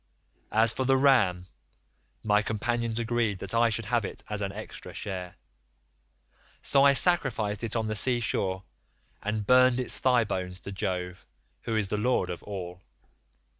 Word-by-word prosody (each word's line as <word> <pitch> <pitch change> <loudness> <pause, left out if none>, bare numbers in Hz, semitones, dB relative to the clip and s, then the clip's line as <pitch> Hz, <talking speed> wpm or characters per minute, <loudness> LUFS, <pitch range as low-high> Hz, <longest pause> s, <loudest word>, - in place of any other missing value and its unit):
As 110 +1 +5
for 130 - -2
the 135 +1 +3
ram, 115 -10 +3 0.8
my 105 -1 +3
companions 115 +2 -2
agreed 115 -3 0
that 100 +2 -6
I 115 0 +4
should 115 0 -3
have 120 +1 0
it - - -7
as 105 -1 -3
an 100 -1 -2
extra - - -9
share; 90 -3 -5 1.3
so 140 -1 +4
I 140 0 +6
sacrificed 120 - +1
it 115 0 -3
on 115 -1 0
the 110 0 -2
sea 120 +3 +2
shore, 95 -4 -1 0.6
and 105 0 -2
burned 125 +1 +5
its 125 - -2
thigh 125 -2 +3
bones 90 -3 -4
to 100 - -7
Jove, 90 -1 -4 0.4
who 115 - -1
is 105 -3 -1
the 105 - -1
lord 120 -2 0
of 90 - -6
all. 90 -3 -7
110 Hz, 165 wpm, -28 LUFS, 100-120 Hz, 1.3 s, I